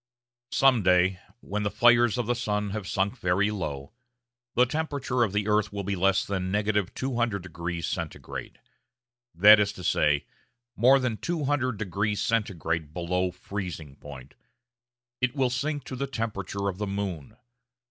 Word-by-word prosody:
Some 135 -4 +4
day, 90 0 +3 0.2
when 105 +1 -3
the 100 - 0
fires 120 +1 +4
of 120 - -1
the 120 - +1
sun 105 -4 -2
have 105 -2 -4
sunk 95 +1 -1
very 95 +4 +1
low, 70 -8 -5 0.6
the 125 - +5
temperature 140 -3 -2
of 110 -5 +2
the 105 +1 -1
earth 105 0 +2
will 100 -1 -4
be 100 +1 -2
less 95 +1 +2
than 95 -2 -2
200° 100 -4 -1 0.6
C.: - - -25 0.8
that 105 +5 +8
is 100 -1 +2
to 90 - -10
say, 75 -3 +2 0.5
more 130 +4 +6
than 125 -4 -1
two 170 +2 -2
hundred 130 -5 0
degrees 105 +1 -1
Centigrade 85 -8 -1
below 90 +1 0
freezing 90 -5 -6
point. 70 -2 -11 0.9
It 130 +2 +1
will 130 -3 +1
sink 145 +3 -2
to 130 - -7
the 140 +2 -3
temperature 100 -5 -3
of 95 -1 -3
the 105 - -2
moon. 100 -1 -4
105 Hz, 150 wpm, -27 LUFS, 90-120 Hz, 0.9 s, that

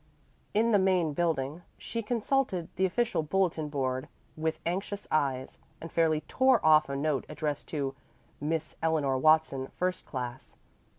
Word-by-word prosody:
In 230 +2 +3
the 205 - +5
main 185 -5 +2
building 155 -1 -1 0.2
she 230 - -3
consulted 230 -5 0
the 190 +1 +2
official 230 -1 0
bulletin 160 -2 0
board 130 -3 -2 0.3
with 160 0 -1
anxious 195 +4 -3
eyes, 135 -4 0 0.2
and 165 - -8
fairly 160 -2 +2
tore 260 +3 +3
off 155 -2 +6
a 140 - -2
note 145 -1 0
addressed 150 -2 -3
to 140 -3 -2 0.5
"Miss 155 +2 -2
Eleanor 150 -5 +1
Watson, 155 -3 +3
First 185 0 -2
Class." 125 -1 -5
160 Hz, 140 wpm, -29 LUFS, 145-185 Hz, 0.5 s, off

